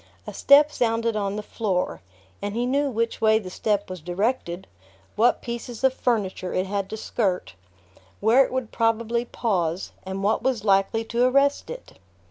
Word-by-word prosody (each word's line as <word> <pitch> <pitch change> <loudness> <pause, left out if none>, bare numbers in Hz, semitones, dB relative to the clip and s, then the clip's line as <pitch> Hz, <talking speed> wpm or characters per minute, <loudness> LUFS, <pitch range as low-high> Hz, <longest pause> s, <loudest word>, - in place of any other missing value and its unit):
A - - -7
step 290 +2 +6
sounded 230 -2 0
on 200 -1 -1
the 210 - -4
floor, 195 -5 -2 0.4
and 205 +1 -4
he 240 +1 0
knew 280 +3 +1
which 230 -1 -2
way 220 0 +5
the 190 -4 -6
step 205 +1 -1
was 185 -2 -7
directed, 180 +1 -2 0.5
what 235 +3 +3
pieces 235 0 -6
of 265 -1 +4
furniture 205 -8 -1
it 185 - +1
had 195 0 -3
to 220 - -5
skirt, 195 - -2 0.7
where 230 +6 +5
it - - -5
would 260 -3 -3
probably 230 +1 0
pause, 185 -8 -2
and 190 +1 -5
what 215 +2 +1
was 250 -5 -1
likely 195 +3 +2
to 235 +2 +1
arrest 275 +2 +2
it. - - -10
225 Hz, 170 wpm, -24 LUFS, 195-245 Hz, 0.7 s, step